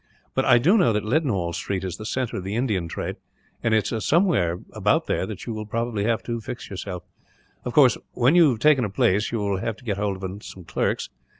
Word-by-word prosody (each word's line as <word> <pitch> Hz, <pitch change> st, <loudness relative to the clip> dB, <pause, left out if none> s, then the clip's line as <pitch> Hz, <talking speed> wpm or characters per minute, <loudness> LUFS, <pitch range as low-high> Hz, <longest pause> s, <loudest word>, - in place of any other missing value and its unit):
But 130 Hz, -, +1 dB
I 120 Hz, -, +6 dB
do 180 Hz, -, +4 dB
know 120 Hz, -, +4 dB
that 105 Hz, 0 st, -1 dB
Leadenhall 110 Hz, -, 0 dB
Street 95 Hz, +2 st, -3 dB
is 90 Hz, -2 st, -4 dB
the 110 Hz, -, -6 dB
centre 125 Hz, +1 st, -2 dB
of 95 Hz, -, -4 dB
the 100 Hz, +3 st, -4 dB
Indian 105 Hz, -8 st, 0 dB
trade, -, -, -4 dB, 0.4 s
and 115 Hz, -, 0 dB
it's 110 Hz, 0 st, 0 dB
somewhere 155 Hz, -, +2 dB, 0.2 s
about -, -, +2 dB
there 95 Hz, -, -1 dB
that 105 Hz, -3 st, -7 dB
you 115 Hz, -, -4 dB
will 110 Hz, 0 st, -6 dB, 0.3 s
have 115 Hz, +2 st, 0 dB
to 115 Hz, -1 st, -3 dB
fix 120 Hz, +1 st, -7 dB
yourself. 90 Hz, -2 st, -5 dB, 0.6 s
"Of 125 Hz, -, -3 dB
course, 135 Hz, -5 st, +5 dB
when 125 Hz, +4 st, +3 dB
you 170 Hz, -4 st, +6 dB
have 120 Hz, -4 st, -1 dB
taken 150 Hz, -2 st, +4 dB
a 105 Hz, -, -1 dB
place, 100 Hz, +2 st, +1 dB
you 115 Hz, -, -1 dB
will 100 Hz, -2 st, -1 dB
have 110 Hz, +2 st, -2 dB
to 130 Hz, -, -19 dB
get 100 Hz, -4 st, -1 dB
hold 100 Hz, -2 st, -2 dB
of 95 Hz, +2 st, -6 dB
some 95 Hz, -, -10 dB
clerks. 80 Hz, -, -1 dB
110 Hz, 225 wpm, -24 LUFS, 95-125 Hz, 0.6 s, I